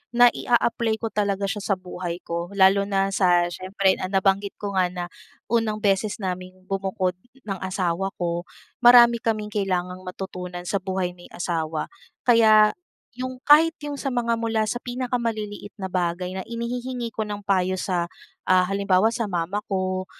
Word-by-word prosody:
nai-aapply 235 -2 +3
ko 225 - -1
talaga 200 -1 0
siya 210 - -2
sa 200 - +2
buhay 180 -1 -6
ko. 170 +3 -4
Lalo 195 +1 +5
na 195 -1 +1
sa 175 -2 +3
siyempre, 190 +2 0
ah, 185 - -2
nabanggit 195 +1 +1
ko 205 -1 -5
nga 180 - +3
na 180 0 -5 0.5
unang 220 -2 0
beses 200 +1 +1
naming 185 0 -4
bumukod 190 -1 -2 0.2
ng 195 -3 -4
asawa 185 0 -2
ko, 175 0 -3 0.3
marami 240 -1 +7
kaming 215 -2 -2
kailangang 185 -3 -1
matutunan 180 -1 -6
sa 195 +3 -1
buhay 185 -1 -2
may 175 0 -15
asawa. 160 -3 -2 0.3
Kaya, 220 -3 +6 0.5
'yong 255 0 -5
kahit 315 +3 +6
'yong 290 -1 -5
sa 275 -1 -3
mga 235 -1 +1
mula 225 -1 0
sa - - -1
pinakamaliliit 235 -5 -3
na 190 - -3
bagay 180 +1 -2
na 190 - -5
inihihingi 240 +1 -4
ko 220 -1 -3
ng 205 -1 -5
payo 185 -2 +1
sa, 175 -3 0 0.4
ah, 185 0 +5
halimbawa 195 +1 +3
sa 235 0 -2
mama 180 0 -2
ko, 185 -1 -2
195 Hz, 155 wpm, -24 LUFS, 185-225 Hz, 0.5 s, marami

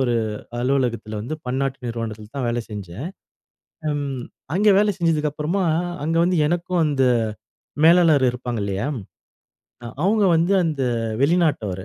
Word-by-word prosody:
ஒரு 125 -2 +1 0.5
அலுவலகத்துல 120 -5 -1
வந்து, 145 +7 -4
பன்னாட்டு 135 +2 -1
நிறுவனத்துல 110 -2 -5
தான் 130 -3 -1
வேல 120 0 0
செஞ்சேன். 105 - -6 0.8
ம், 140 -3 -3 0.3
அங்க 210 +2 +3
வேல 205 0 +3
செஞ்சதுக்கு 155 -3 +1
அப்றமா, 165 +6 -1 0.4
அங்க 165 +1 0
வந்து 180 -1 +1
எனக்கு 175 +2 -2
அந்த 140 -3 +1 0.8
மேலாளர் 165 -5 +6
இருப்பாங்க, 120 -2 -4
இல்லையா? 100 +5 -2 1.0
அ - - -5 0.2
அவங்க 210 +1 +3
வந்து, 170 +4 +2
அந்த 155 -5 -1 0.4
வெளிநாட்டவரு. 140 - +1
140 Hz, 125 wpm, -22 LUFS, 120-165 Hz, 1.0 s, மேலாளர்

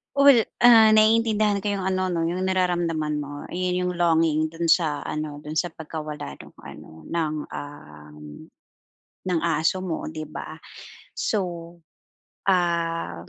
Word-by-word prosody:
Well, 280 -5 +6 0.2
ah, 225 -2 +7
naiintindihan 215 -2 +3
ko 205 - 0
yung 195 -2 -3
ano 185 -1 -1
'no, 170 - -1
yung 185 +2 -2
nararamdaman 175 -5 0
mo, 145 0 -6
'yon 180 0 -2
yung 180 0 -1
longing 160 -2 +2
dun 165 0 -3
sa 160 -4 +2
ano, 150 -1 -4
dun 150 +1 -8
sa 175 0 0
pagkawala 150 - -7
nung - - -14
ano - - -12 0.2
ng, 160 -2 -1
um, 75 - -10 1.1
ng 170 - +2
aso 165 +2 0
mo 180 -4 -4
'di 155 0 -6
ba? - - -8 0.6
So, 175 -4 -3 0.7
um, 170 - 0
170 Hz, 135 wpm, -24 LUFS, 155-185 Hz, 1.1 s, ah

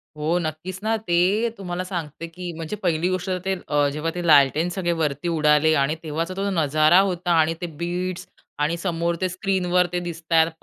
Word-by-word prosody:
हो 155 +3 0
नक्कीच 165 +4 -5
ना, 220 +1 +1
ते 200 +3 +1
तुम्हाला 180 -2 -4
सांगते 165 -3 -5
की 175 +1 -7
म्हणजे 165 +5 -5
पहिली 170 0 +1
गोष्ट 185 0 -2
तर, 185 - 0
ते 195 0 +1 0.4
जेव्हा 150 +3 -2
ते 175 -1 -3
लालटेन 150 +2 +5
सगळे 175 -2 0
वरती 145 +1 -1
उडाले 150 +1 +4
आणि 145 +3 +1
तेव्हाचा 165 +3 -3
तो 200 +1 -1
नजारा 155 -1 +4
होता 175 -1 -2
आणि 160 +1 +3
ते - - -2 0.2
बीट्स 180 +1 -3 0.3
आणि 150 +3 +1
समोर 170 -1 -1
ते 185 - +2
स्क्रीनवर 180 -1 +1
ते 175 - +1
दिसताय. 165 -1 +1
170 Hz, 180 wpm, -23 LUFS, 155-180 Hz, 0.4 s, लालटेन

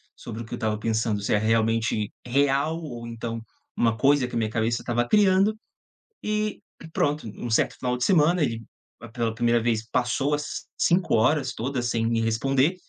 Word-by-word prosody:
sobre 115 0 -7
o - - -10
que - - -10
eu - - -3
estava 110 -1 -1
pensando, 110 -2 0
se 100 - 0
é - - +4
realmente 110 -1 +1
real 140 +5 +1
ou 120 -5 -7
então 115 0 -5 0.4
uma 115 -1 +2
coisa 140 -2 +3
que 125 - -7
a - - +1
minha 110 -1 0
cabeça 115 +2 0
estava 120 0 0
criando. 200 - +4 0.7
E 215 0 -1 0.3
pronto, 145 -4 0
um 120 - -5
certo - - +2
final 125 -1 -1
de 125 - 0
semana 170 -1 +4
ele 115 -3 -2 0.5
pela 115 -2 -1
primeira 120 0 +2
vez 115 -1 0
passou 130 +3 0
as 150 0 -3
5 175 -4 +2
horas 130 +3 +2
todas 125 +1 -3
sem 115 -1 0
me 115 -1 +1
responder, 135 +8 +1
120 Hz, 180 wpm, -25 LUFS, 115-145 Hz, 0.7 s, é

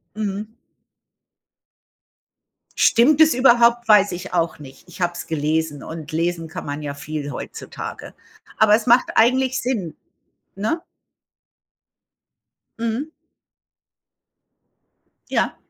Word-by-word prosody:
Mhm. 210 +1 -4 2.2
Stimmt 275 +6 +4
es 315 -3 +6
überhaupt? 240 -2 +4
Weiß 205 -2 +5
ich 180 +2 -7
auch 170 -2 0
nicht. 135 +2 -14
Ich 175 - -13
habe 175 -1 +1
es 175 - -8
gelesen 155 -1 -1
und 160 -2 -8
lesen 165 0 -1
kann 160 - -7
man 145 +1 -5
ja 145 -1 -5
viel 145 0 -6
heutzutage. 130 - -8 0.4
Aber 215 -1 +5
es 220 +2 +1
macht 245 +1 +4
eigentlich 260 +3 +3
Sinn, 215 -11 -3 0.6
ne? 220 +12 -2 2.0
Mhm. 230 +6 -2 2.2
Ja. - - 0
200 Hz, 105 wpm, -21 LUFS, 160-235 Hz, 2.2 s, es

